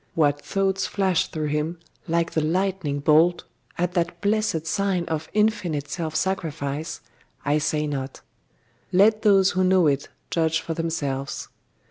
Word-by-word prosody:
What 145 -2 +2
thoughts 195 -1 0
flashed 190 -4 +1
through 155 -2 -2
him, 150 +3 -1 0.3
like 170 0 +1
the 160 - 0
lightning 170 -3 -1
bolt, 160 +4 +4 0.3
at 175 0 0
that 170 -1 -1
blessed 205 -6 0
sign 190 -1 0
of 160 -1 -3
infinite 185 -9 0
self 160 -2 -3
sacrifice, 160 -5 -2 0.4
I 145 +1 +2
say 150 0 0
not; 135 -2 -4 0.7
let 210 +4 +4
those 195 -3 +5
who 185 +1 +1
know 185 -1 +4
it 140 -2 +1 0.2
judge 160 -1 +1
for 165 - -4
themselves. 145 -5 -3
165 Hz, 140 wpm, -24 LUFS, 150-190 Hz, 0.7 s, those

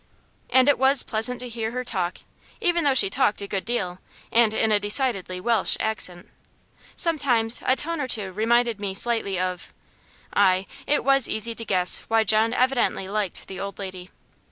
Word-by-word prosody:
And 260 +1 +4
it 285 - +3
was 270 +1 +4
pleasant 230 +2 0
to 250 - -6
hear 225 -2 -4
her 250 0 -3
talk, 185 -7 -3 0.4
even 345 -5 +1
though 280 -2 +2
she 250 - +5
talked 200 +2 0
a 200 - -4
good 195 -1 -3
deal, 185 -7 -3 0.3
and 230 -2 +4
in 220 0 0
a 210 - +3
decidedly 205 -4 +1
Welsh 225 +1 +1
accent. 185 -5 -2 0.7
Sometimes 245 -9 +1
a 260 - +4
tone 330 +2 -2
or 265 - -2
two 205 -6 0
reminded 230 +1 +1
me 200 -2 -4
slightly 225 -3 0
of 185 -1 -4 0.6
Ay, 190 -1 +3 0.2
it 295 - +1
was 275 -2 +3
easy 220 +2 0
to 230 0 -5
guess 185 -3 +2
why 225 0 +2
John 220 +2 +2
evidently 250 -6 0
liked 200 -2 -3
the 190 - -8
old 200 0 -6
lady. 185 -2 -8
220 Hz, 180 wpm, -24 LUFS, 195-250 Hz, 0.7 s, she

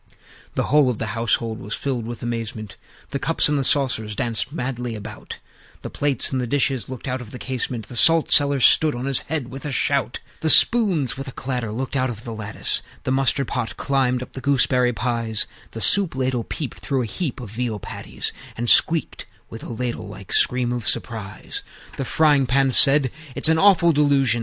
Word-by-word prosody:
IV. - - -27 0.4
The - - 0
whole 145 -2 +3
of 120 - -2
the 110 -3 -4
household 115 0 -1
was 105 - -4
filled 125 -5 -3
with 120 -1 -7
amazement: 115 -3 -5 0.4
The 140 - -2
Cups 165 - +2
and 150 - +1
the - - 0
Saucers 120 -7 +1
danced 115 +2 -1
madly 125 -5 -4
about; 105 - -9 0.5
The - - -6
Plates 140 -4 0
and 130 -1 -1
the 125 - -3
Dishes 130 -1 0
looked 130 -1 -7
out 130 0 -3
of 120 - -10
the 125 - -9
casement; 125 -3 -4
The 120 - -9
Salt 165 +6 +5
cellar 140 -1 +4
stood 150 +3 +5
on 120 +2 -5
his 135 -2 +3
head 150 -5 -4
with 135 +1 -9
a 150 - -4
shout; 135 -2 0 0.2
The 160 - -1
Spoons, 175 - +5
with 135 +1 -6
a - - -6
clatter, 125 -4 -4
looked 130 +5 -4
out 130 -1 +1
of 115 -2 -7
the 115 - -6
lattice; 110 -1 -1 0.2
The 130 - -2
Mustard 135 0 +1
pot 110 -1 -4
climbed 130 -2 0
up - - -14
the 130 - -7
gooseberry 125 -3 +2
pies; 115 -2 -2 0.2
The 115 - -8
Soup 190 - +2
ladle 130 -3 -1
peeped 145 -6 -6
through 135 -3 -1
a - - -3
heap 135 - -4
of 115 -6 -9
veal 115 -1 -3
patties, - - -5 0.2
And 120 +1 -3
squeaked 160 +6 +3 0.2
with 115 - -8
a - - -8
ladle 120 -1 -4
like 100 -1 -9
scream 125 -1 +1
of 120 -3 -4
surprise. 110 -5 -4 0.3
V. - - -17
The 135 - -3
Frying 145 -3 +3
pan 135 +2 +2
said, 135 0 +6 0.2
"It's - - +4
an 160 0 +3
awful 180 -3 +5
delusion!" 140 -5 +2
125 Hz, 205 wpm, -22 LUFS, 115-140 Hz, 0.5 s, said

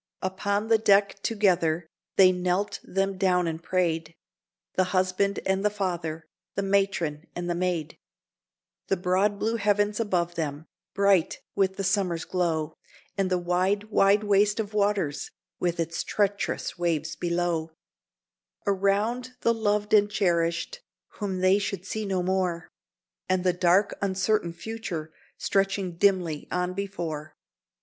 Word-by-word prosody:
Upon 200 +3 -1
the 225 -1 +4
deck 200 -2 +3
together 175 -7 +1 0.3
they 185 -1 +7
knelt 180 +2 -1
them 195 0 -1
down 180 -2 +3
and 165 0 -3
prayed, 165 -2 -1 0.6
The 185 - +2
husband 185 +2 +1
and 190 +1 +1
the 210 - +4
father, 175 -6 -3 0.3
the 200 - -1
matron 195 -6 0
and 175 0 -4
the 175 - 0
maid; 170 -3 -2 0.9
The 195 - +1
broad 185 +3 +1
blue 225 +3 0
heavens 205 0 +1
above 180 -6 0
them, 155 -2 -4 0.3
bright 200 -4 +3
with 190 -1 +1
the 195 - -3
summer's 190 -4 0
glow, 165 -4 -1 0.4
And 195 -2 0
the 185 - +2
wide, 185 +4 0
wide 205 +1 +4
waste 205 +1 +3
of 215 -1 -3
waters, 200 -8 0 0.3
with 175 -1 -1
its 165 0 -2
treacherous 200 -4 -1
waves 160 -2 -1
below; 170 -2 -1 1.0
Around, 205 +6 0
the 230 - +3
loved 210 -1 0
and 205 -1 +6
cherished, 170 - 0 0.4
whom 190 -3 -2
they 185 +2 +4
should 195 -2 -4
see 215 +1 -3
no 185 -2 0
more, 180 -2 -1 0.6
And 185 -1 +2
the 180 -1 +3
dark, 180 +3 +3
uncertain 195 -2 0
future 170 -5 -6 0.2
stretching 195 -3 0
dimly 175 -6 +1
on 180 0 -1
before. 170 -6 -5
190 Hz, 135 wpm, -27 LUFS, 175-200 Hz, 1.0 s, they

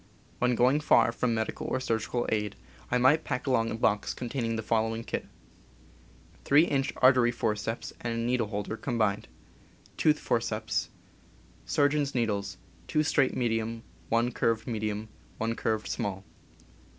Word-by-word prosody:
When 125 0 +2
going 130 +5 +4
far 150 -5 +4
from 115 0 0
medical 110 0 -3
or 130 - 0
surgical 120 -1 -1
aid, 105 -2 -1 0.3
I 125 - +2
might 130 +6 +4
pack 125 - -3
along 115 -4 +2
a - - -3
box 105 -2 +1
containing 120 -2 -2
the 110 - -3
following 115 +1 0
kit: - - -4 1.2
3 145 +3 +5
in. 140 -5 +1 0.2
artery 125 -2 +6
forceps 115 -1 -2
and 115 -1 -2
needle 120 -2 +1
holder 105 +1 -4
combined. 110 -6 -1 0.7
Tooth - - +4
forceps. - - -1 0.8
Surgeon's 145 -1 +1
needles: 100 -5 -1 0.3
2 155 - +2
straight 140 -3 +2
medium, 115 -1 -1 0.3
1 115 +2 +2
curved 115 -1 0
medium, 110 -2 -3 0.3
1 115 +1 -1
curved 110 -3 -1
small. 95 -1 -3
115 Hz, 140 wpm, -29 LUFS, 110-125 Hz, 1.2 s, artery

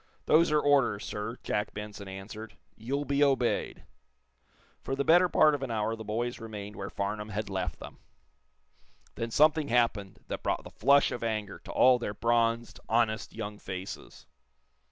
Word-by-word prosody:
"Those 165 +2 +5
are 150 - +4
orders, 140 -8 +2
sir," 105 +4 -5
Jack 105 0 -2
Benson 105 -1 -7
answered. 100 +3 -9 0.2
"You'll 140 +6 -3
be 140 0 +2
obeyed." 135 -4 0 1.0
For 135 - -3
the 140 - 0
better 175 +4 +5
part 155 -2 +5
of 145 - -2
an 135 - -3
hour 110 0 -1
the 110 - -8
boys 115 +3 -3
remained 105 -2 -7
where 100 - -5
Farnum 105 +2 -3
had 105 -1 -4
left 90 -6 -3
them. - - -11 1.1
Then 115 - -4
something 155 +4 +4
happened 115 -6 +1
that - - -4
brought - - -1
the - - -11
flush 140 0 +4
of 120 - -4
anger 110 -3 -3
to - - -10
all 125 -1 +5
their 105 -3 -4
bronzed, 115 +1 +1
honest 110 -1 +1
young 105 -2 -6
faces. 95 0 -8
115 Hz, 165 wpm, -29 LUFS, 105-135 Hz, 1.1 s, Those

